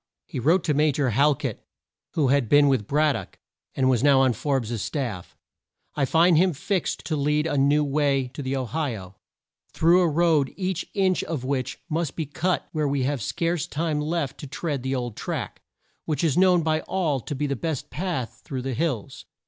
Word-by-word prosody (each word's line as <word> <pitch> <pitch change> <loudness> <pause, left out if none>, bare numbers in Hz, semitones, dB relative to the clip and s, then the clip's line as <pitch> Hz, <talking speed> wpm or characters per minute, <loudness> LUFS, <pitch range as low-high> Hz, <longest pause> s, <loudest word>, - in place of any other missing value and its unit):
He - - -5
wrote 165 +8 +3
to 155 - +1
Ma 150 +2 +3
jor 140 -3 0
Hal 145 +6 +4
ket, - - -5 0.5
who 145 -5 +2
had 135 -4 +2
been 145 0 +6
with 130 -7 +1
Brad 150 +1 +3
dock, 100 -7 -7 0.4
and 130 - +2
was 125 -3 +3
now 140 -1 +5
on 130 -2 +3
Forbes' 120 -5 -2
staff: 120 - -4 0.6
"I 140 - +1
find 165 +3 +4
him 185 0 +3
fixed 180 +5 -2
to 160 - -1
lead 150 +1 +1
you - - -1
a - - 0
new 145 +2 +3
way 140 -2 +1
to 130 +3 -7
the 135 0 -2
O 130 -1 -2
hi 145 -1 -2
o, 95 -1 -10 0.6
through 170 +3 +4
a 175 - +3
road 155 -3 +2
each 185 -2 -2
inch 190 -2 +2
of 155 -6 -4
which 130 -1 -3
must 165 -2 -2
be 160 - -2
cut 170 +5 -1
when 155 -3 0
we 140 -1 0
have 140 -1 -1
scarce 165 - -1
time 155 -1 -1
left 150 -3 -2
to 145 - -7
tread 145 0 -3
the 130 +1 -2
old 120 -4 -3
track, - - -5 0.4
which 155 -1 -1
is 155 -5 +2
known 180 -2 +4
by 155 0 +1
all 160 -8 -1
to 145 - -6
be 145 +2 -1
the 140 -1 -1
best 150 +1 -4
path 135 - -4
through 130 -3 -5
the 135 0 -2
hills." 135 -6 -3
145 Hz, 210 wpm, -25 LUFS, 130-160 Hz, 0.6 s, been